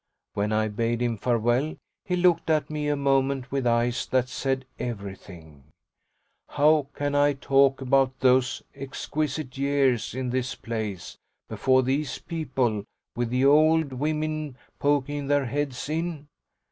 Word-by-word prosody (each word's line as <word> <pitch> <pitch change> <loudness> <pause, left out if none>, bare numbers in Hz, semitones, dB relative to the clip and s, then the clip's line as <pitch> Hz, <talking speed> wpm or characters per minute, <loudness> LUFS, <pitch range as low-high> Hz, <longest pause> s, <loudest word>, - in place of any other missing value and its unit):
When 105 +1 -1
I 110 0 +1
bade 115 +2 -1
him 120 -1 0
farewell 120 +6 0 0.3
he 180 -3 0
looked 175 -2 +2
at 155 -1 +1
me 150 -1 -2
a 145 - +1
moment 135 -1 +1
with 135 -2 0
eyes 120 +1 +1
that 130 -1 +1
said 135 0 -2
everything: 95 - -8 0.8
"How 150 0 +3
can 145 0 -2
I 145 0 +4
talk 135 0 +3
about 135 0 +2
those 130 +1 +2
exquisite 140 0 -4
years 135 -5 +1
in 130 -1 -2
this 130 0 -2
place, 110 -5 -5 0.3
before 130 0 +2
these 135 +2 -1
people, 130 -10 -2 0.3
with 120 -1 -1
the 125 +2 +1
old 155 0 +4
women 155 0 -2 0.2
poking 145 0 0
their 145 -1 +2
heads 140 +1 -3
in? 160 -1 -3
135 Hz, 135 wpm, -26 LUFS, 120-145 Hz, 0.8 s, I